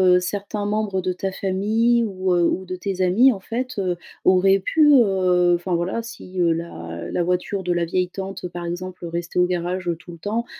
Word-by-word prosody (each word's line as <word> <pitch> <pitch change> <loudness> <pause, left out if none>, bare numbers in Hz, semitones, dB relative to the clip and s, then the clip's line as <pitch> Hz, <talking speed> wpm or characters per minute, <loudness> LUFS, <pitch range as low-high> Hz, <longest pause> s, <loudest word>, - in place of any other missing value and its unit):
heu, - - +5
certains 205 +2 -3
membres 205 -2 -1
de 185 0 -1
ta 190 +2 -3
famille 220 +5 +1
ou, 185 -3 -1
heu, 175 -1 +3
ou 190 - -1
de 185 0 -5
tes 190 0 -3
amis, 220 +9 +5
en 195 - -9
fait, 250 +5 -4
heu, 185 -3 -1 0.3
auraient 195 +1 +4
pu, 300 - +3
heu, 185 -6 +4
enfin 175 +1 -2
voilà, 175 +6 -1
si, 225 -5 -8
heu, 170 -2 +3
la 85 - -6
la 175 - 0
voiture 180 +2 -1
de 180 0 0
la 175 0 0
vieille 180 +2 0
tante, 190 0 -6
par 175 0 -7
exemple, 175 +1 -5
restait 170 +1 -4
au 180 - +5
garage 180 0 -2
tout 175 - -11
le - - -10
temps, 215 +7 -2
185 Hz, 210 wpm, -22 LUFS, 175-200 Hz, 0.3 s, heu